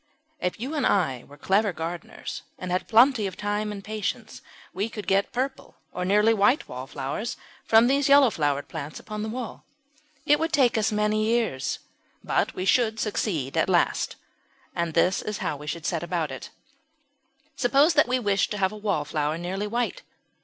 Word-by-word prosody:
If 180 - -2
you 260 +7 -4
and 295 -4 -1
I 135 - +1
were 145 - -14
clever 200 +7 +2
gardeners 165 +1 -6 0.2
and 185 -1 -5
had 180 - -1
plenty 235 -1 +5
of 185 - -7
time 210 +1 -2
and 200 -1 -7
patience, 215 +2 -4 0.3
we 200 +5 -2
could 215 -3 -7
get 195 +1 +1
purple 265 +2 -3 0.2
or 180 - -3
nearly 210 +4 +4
white 220 +7 +3
wallflowers 135 - -5 0.3
from 225 +1 +6
these 275 +2 +2
yellow 280 -4 +7
flowered 145 -4 -1
plants 155 -1 -6
upon 215 -1 -6
the 220 - -3
wall. 240 0 -6 0.6
It 295 +1 +4
would 325 0 -1
perhaps 270 -5 +5
take - - -2
us 220 +1 +1
many 210 0 +1
years, 220 - 0 0.5
but - - 0
we 185 - -3
should 220 +2 +2
succeed 175 - -2
at - - +2
last. - - +1 0.6
This 170 +2 +1
is 210 -1 -4
how - - -2
we 150 +1 -10
should 165 +2 -4
set 170 -2 -1
about 170 -4 -2
it. 130 - -7 1.1
Suppose 280 +6 +4
that 300 -5 +4
we 255 +1 +2
wished 200 -5 +1
to 210 - -3
have 190 -1 +1
a 215 - -8
Wallflower 155 -6 -1
nearly 190 +4 -3
white. 240 - -2
205 Hz, 180 wpm, -26 LUFS, 170-230 Hz, 1.1 s, yellow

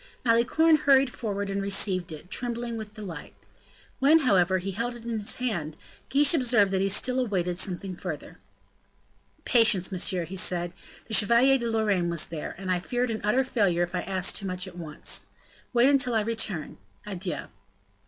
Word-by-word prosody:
Malicorne 250 +8 +4
hurried 275 -3 +4
forward, 200 -3 -3
and 195 0 -2
received 195 -3 -1
it, 160 +4 -10
trembling 235 0 -1
with 215 -1 -8
delight. 185 -8 -8 0.6
When, 310 +4 +5
however, 190 - +3
he 190 +2 -4
held 235 +5 -3
in 235 -1 -4
his 205 - -3
hand, 175 -12 -3 0.3
Guiche 285 +2 +4
observed 235 -9 +3
that 190 -1 +1
he 195 - +1
still 250 +6 +1
awaited 180 -7 -1
something 185 0 -3
further. - - -7 1.1
"Patience, 220 -6 +3
monsieur," 180 -1 0
he 185 +4 -8
said; 175 -2 -1 0.3
"the 220 - -8
Chevalier 235 +6 +4
de 235 -1 -2
Lorraine 205 -6 +1
was 170 -2 0
there, 160 -3 -6
and 190 0 -4
I 180 - +1
feared 245 +6 -2
an 220 - -4
utter 215 +6 +2
failure 200 -9 +1
if 175 0 -5
I 180 - -1
asked 190 -1 0
too 200 - -4
much 185 0 -3
at 180 - -11
once. 160 -4 -2 0.4
Wait 240 +1 +4
until 275 -4 +3
I 220 - +3
return. 210 - -3 0.3
Adieu." 190 -3 -4
205 Hz, 175 wpm, -27 LUFS, 180-240 Hz, 1.1 s, When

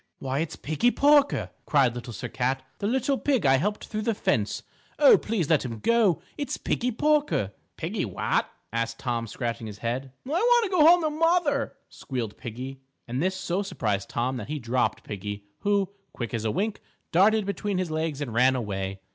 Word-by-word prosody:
"Why, 135 0 -2
it's 160 0 -2
Piggie 155 +11 +1
Porker," 285 +2 +4 0.2
cried 135 -6 +4
Little 120 0 -7
Sir 125 - -5
Cat, 130 +2 -1 0.2
"the 200 - -1
little 265 +3 +1
pig 265 - +1
I 135 0 +6
helped 205 +9 -1
through 215 -1 -4
the 225 0 0
fence. - - 0 0.3
O, - - +8
please 210 - -1
let 155 -3 +3
him 115 -3 -5
go. 215 - +2 0.2
It's 285 0 -2
Piggie 250 - -1
Porker." 290 - +1 0.3
"Piggie - - -2
what?" - - 0 0.2
asked 115 0 -1
Tom, 120 -2 -2
scratching 115 0 -4
his 105 -1 -8
head. 125 +4 -3
"I - - -8
want 475 +8 +4
to 400 - -2
go 320 -4 +6
home 345 0 +7
to 310 - +1
mother," 310 -3 +1
squealed 120 -6 -5
Piggie, 130 +3 -7 0.3
and 125 +3 -2
this 185 +2 +1
so 185 0 -1
surprised 105 - -2
Tom 125 +2 -1
that 110 -4 -6
he 150 - -2
dropped 125 -1 0
Piggie, 105 0 -6
who, 200 -2 +1 0.2
quick 120 -4 -5
as 115 -1 -2
a - - +2
wink, 210 - -2 0.3
darted 210 +4 +4
between 200 0 -2
his 180 -3 -1
legs 155 -2 -2
and 125 -6 -3
ran 130 +3 +4
away. 95 -4 -3
155 Hz, 190 wpm, -26 LUFS, -, 0.3 s, O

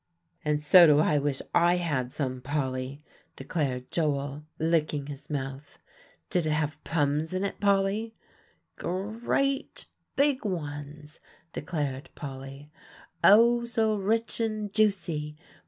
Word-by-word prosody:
"And 150 0 0
so 175 +3 +8
do 150 -1 +6
I 150 -1 +3
wish 140 -1 -1
I 175 +1 +5
had 145 -8 -1
some, 130 -3 -3
Polly," 135 0 -3 0.3
declared 130 -6 -3
Joel, 145 -3 -1 0.2
licking 155 -3 +1
his 140 -1 -9
mouth. 135 0 -5 0.5
"Did 175 -3 +1
it 155 - +1
have 150 -1 -2
plums 150 +2 0
in, 195 +2 0
Polly?" 200 +3 +1 0.6
"Gre 205 +6 -3
at 275 0 0 0.3
big 280 -1 +2
ones," 150 -5 -5 0.3
declared 145 -6 -3
Polly, 135 +1 -8 0.5
"oh, 235 +3 +7
so 225 -2 +1
rich 220 +4 -1
and 215 -3 -2
juicy! 170 -8 0
155 Hz, 120 wpm, -28 LUFS, 145-200 Hz, 0.6 s, so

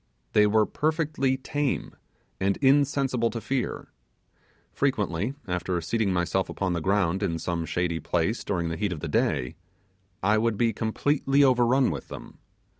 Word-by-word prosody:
They 105 0 +5
were 110 +1 +3
perfectly 150 -3 0
tame 145 +1 -2 0.4
and 95 0 +1
insensible 135 -3 +2
to 115 - -4
fear. 130 +3 -3 0.8
Frequently, 95 - -1
after 90 0 -1
seating 100 +4 0
myself 90 +1 0
upon 95 -2 -2
the 85 - -2
ground 95 +1 +1
in 85 -5 -1
some 85 0 -3
shady 85 -2 -1
place 90 +9 -1
during 85 -4 -1
the 80 - -4
heat 105 -3 -1
of 75 - -8
the - - -3
day, 65 +6 0 0.7
I 105 +3 +3
would 115 -1 0
be 115 0 +2
completely 135 +6 +1
overrun 125 -2 +4
with 70 -5 -6
them. - - -10
105 Hz, 150 wpm, -26 LUFS, 90-130 Hz, 0.8 s, They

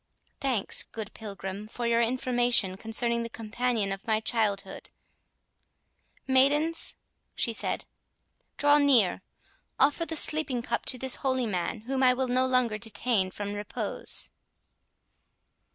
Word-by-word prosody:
Thanks, 255 -7 +1
good 220 -1 -7
Pilgrim, 200 -1 -7
for 240 +2 -5
your 235 0 +3
information 240 -4 +1
concerning 235 +3 -1
the 230 - -5
companion 225 -2 -2
of 195 +2 -6
my 220 -1 +2
childhood.—Maidens," 260 +7 -2 0.4
she 230 - 0
said, - - -1 0.7
"draw 290 0 +5
near—offer 280 - +1
the 325 - -3
sleeping 300 -6 +3
cup - - -3
to 255 - +3
this 260 0 0
holy 260 -2 0
man, 205 +1 -2
whom 260 +4 -2
I 250 -1 +5
will 260 0 -1
no 255 +1 +2
longer 250 -4 +1
detain 225 -3 0
from 205 +2 -5
repose." 205 0 -2
235 Hz, 120 wpm, -28 LUFS, 215-260 Hz, 0.7 s, draw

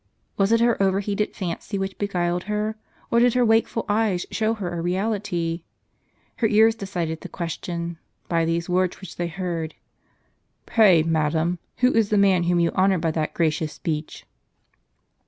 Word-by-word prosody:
Was 195 +1 +2
it 230 0 +4
her 235 -3 +2
over 195 0 +3
heated 205 +1 -2
fancy 190 +2 -4
which 195 0 -4
beguiled 180 -3 -1
her, 210 +1 -2 0.4
or 235 - +4
did 245 0 +4
her 250 -1 +4
wakeful 225 0 +2
eyes 205 -4 +1
show 220 +1 0
her 180 -5 -4
a 170 - -3
reality? 180 -2 -1 0.8
Her 225 - +2
ears 220 +1 +5
decided 175 -7 -4
the - - -8
question, 170 -1 -5 0.3
by 165 -1 +1
these 165 +1 -1
words 180 0 0
which 190 -3 -10
they 175 - -1
heard: 170 -2 -4 0.5
" - - -46
Pray, 190 -8 +5
madam, 160 +2 0 0.2
who 250 +1 +3
is 225 -2 +2
the 210 - +2
man 190 -3 +4
whom 175 0 +2
you 170 -1 +2
honor 190 0 +3
by 165 -1 0
that 155 -1 -2
gracious 155 -2 0
speech 155 -1 -4
185 Hz, 170 wpm, -24 LUFS, 170-210 Hz, 0.8 s, ears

